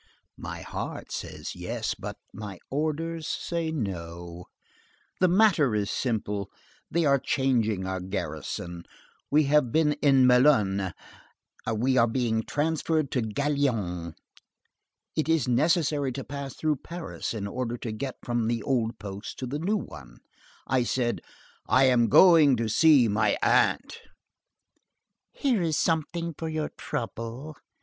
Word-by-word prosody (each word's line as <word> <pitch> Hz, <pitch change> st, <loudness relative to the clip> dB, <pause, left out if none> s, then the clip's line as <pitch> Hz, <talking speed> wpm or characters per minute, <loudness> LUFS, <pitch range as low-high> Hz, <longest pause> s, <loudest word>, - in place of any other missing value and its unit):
"My -, -, -6 dB
heart -, -, -6 dB
says -, -, -6 dB
'yes,' -, -, -3 dB
but -, -, -7 dB, 0.2 s
my 105 Hz, -3 st, -7 dB
orders 155 Hz, +2 st, -2 dB
say 170 Hz, -2 st, -2 dB
'no.' 85 Hz, -, -5 dB, 0.7 s
The 185 Hz, -, +5 dB
matter 175 Hz, -, +4 dB
is 100 Hz, -1 st, -1 dB
simple. 105 Hz, -5 st, -2 dB, 0.4 s
They 170 Hz, 0 st, +1 dB
are 140 Hz, -1 st, +4 dB
changing 115 Hz, -9 st, +1 dB
our 95 Hz, 0 st, -2 dB
garrison; 85 Hz, -1 st, -5 dB, 0.5 s
we 150 Hz, +2 st, +4 dB
have 140 Hz, -3 st, +3 dB
been 155 Hz, +1 st, +3 dB
at 150 Hz, -, -5 dB
Melun, 125 Hz, -, +4 dB, 0.8 s
we 130 Hz, +4 st, +2 dB
are 115 Hz, -1 st, +5 dB
being 115 Hz, -2 st, 0 dB
transferred 155 Hz, +2 st, -1 dB
to 125 Hz, -, +1 dB
Gaillon. 110 Hz, -, -1 dB, 1.0 s
It 155 Hz, 0 st, -1 dB
is 160 Hz, -4 st, +2 dB
necessary 145 Hz, +1 st, +2 dB
to 135 Hz, -, -5 dB
pass 140 Hz, 0 st, -6 dB
through 155 Hz, -2 st, 0 dB
Paris 170 Hz, -5 st, -6 dB
in 100 Hz, -2 st, -3 dB
order 120 Hz, +3 st, -3 dB
to 115 Hz, -, -5 dB
get 125 Hz, +4 st, -4 dB
from 120 Hz, -2 st, -1 dB
the 115 Hz, -2 st, -1 dB
old 115 Hz, -4 st, 0 dB
post 100 Hz, 0 st, -7 dB
to 130 Hz, -, -4 dB
the 140 Hz, +4 st, -4 dB
new 200 Hz, +7 st, +1 dB
one. 60 Hz, -, -9 dB, 0.5 s
I 130 Hz, 0 st, +1 dB
said: 120 Hz, 0 st, -1 dB, 0.5 s
'I 130 Hz, -, +4 dB
am 125 Hz, -3 st, +4 dB
going 160 Hz, -7 st, +7 dB
to 115 Hz, -1 st, -1 dB
see 145 Hz, 0 st, +5 dB
my 105 Hz, 0 st, +2 dB
aunt.'" -, -, +2 dB, 1.3 s
"Here 250 Hz, -8 st, 0 dB
is 160 Hz, -3 st, 0 dB
something 165 Hz, +1 st, 0 dB
for 160 Hz, +2 st, -4 dB
your 155 Hz, -1 st, -2 dB
trouble." 115 Hz, +7 st, -5 dB
130 Hz, 135 wpm, -27 LUFS, 110-155 Hz, 1.3 s, going